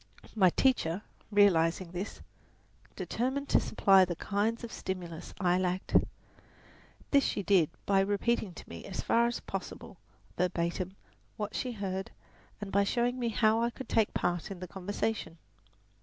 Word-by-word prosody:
My 190 Hz, -4 st, +6 dB
teacher, 200 Hz, -5 st, +1 dB, 0.3 s
realizing 185 Hz, -4 st, +3 dB
this, 180 Hz, +4 st, -5 dB, 0.7 s
determined 265 Hz, +4 st, -2 dB
to -, -, +5 dB
supply 195 Hz, -3 st, +5 dB
the 175 Hz, -1 st, -1 dB
kinds 215 Hz, +6 st, -1 dB
of 235 Hz, -, -6 dB
stimulus 175 Hz, -3 st, -5 dB
I 180 Hz, -2 st, +3 dB
lacked. 185 Hz, 0 st, -2 dB, 1.2 s
This 280 Hz, -1 st, +5 dB
she 205 Hz, -, -1 dB
did 185 Hz, -6 st, +4 dB, 0.2 s
by 195 Hz, -1 st, +3 dB
repeating 205 Hz, +2 st, +1 dB
to -, -, -11 dB
me -, -, -9 dB
as 195 Hz, -, -4 dB
far 235 Hz, +1 st, +3 dB
as 240 Hz, -, -3 dB
possible, 195 Hz, +2 st, -7 dB, 0.4 s
verbatim, 180 Hz, +1 st, -1 dB, 0.4 s
what 210 Hz, 0 st, -3 dB
she 250 Hz, -1 st, -2 dB
heard, 190 Hz, -3 st, -3 dB, 0.5 s
and 200 Hz, -1 st, -6 dB
by 200 Hz, +1 st, +4 dB
showing 245 Hz, +4 st, 0 dB
me 240 Hz, -1 st, 0 dB
how 220 Hz, 0 st, +3 dB
I 235 Hz, -, +2 dB
could 260 Hz, +2 st, -9 dB
take 220 Hz, -2 st, +2 dB
part 175 Hz, +2 st, -1 dB
in 195 Hz, -2 st, -7 dB
the 185 Hz, -, -6 dB
conversation. 195 Hz, 0 st, -3 dB
200 Hz, 150 wpm, -31 LUFS, 180-225 Hz, 1.2 s, My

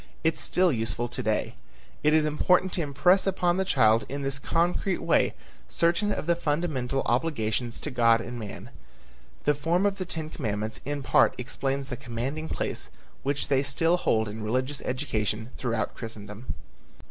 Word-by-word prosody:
It 160 Hz, 0 st, +3 dB
is -, -, -5 dB
still 180 Hz, -1 st, +3 dB
useful 115 Hz, -1 st, -1 dB
to -, -, -3 dB
day. 110 Hz, -1 st, 0 dB, 0.5 s
It 150 Hz, -, +5 dB
is 155 Hz, 0 st, +4 dB
important 180 Hz, +5 st, +2 dB
to 175 Hz, -, 0 dB
impress 175 Hz, +7 st, +3 dB
upon 180 Hz, -2 st, +2 dB
the 190 Hz, -, +2 dB
child 115 Hz, -10 st, +4 dB
in 140 Hz, +1 st, -4 dB
this 135 Hz, 0 st, -2 dB
concrete 175 Hz, +4 st, +1 dB
way -, -, +2 dB, 0.3 s
certain 175 Hz, +5 st, +2 dB
of -, -, -2 dB
the 170 Hz, +1 st, +3 dB
fundamental 145 Hz, -5 st, -1 dB
obligations 120 Hz, -3 st, 0 dB
to 150 Hz, -, -4 dB
God 115 Hz, -2 st, +4 dB
and 120 Hz, +1 st, -6 dB
man. 105 Hz, -3 st, -8 dB, 0.7 s
The 150 Hz, -, +4 dB
form 165 Hz, +6 st, +1 dB
of 200 Hz, -1 st, 0 dB
the 185 Hz, -, -2 dB
ten 160 Hz, -3 st, -5 dB
commandments 110 Hz, -4 st, -3 dB
in 145 Hz, 0 st, -3 dB
part -, -, +4 dB
explains 135 Hz, +2 st, -2 dB
the 125 Hz, -, -4 dB
commanding 135 Hz, +5 st, -4 dB
place -, -, -3 dB, 0.3 s
which 140 Hz, 0 st, -1 dB
they 135 Hz, -2 st, +3 dB
still 155 Hz, +5 st, +2 dB
hold 110 Hz, -10 st, +1 dB
in 105 Hz, +2 st, -6 dB
religious 130 Hz, +6 st, -1 dB
education 115 Hz, -4 st, -2 dB
throughout 115 Hz, -4 st, -2 dB
Christendom. 110 Hz, +1 st, -7 dB
135 Hz, 170 wpm, -27 LUFS, 115-165 Hz, 0.7 s, It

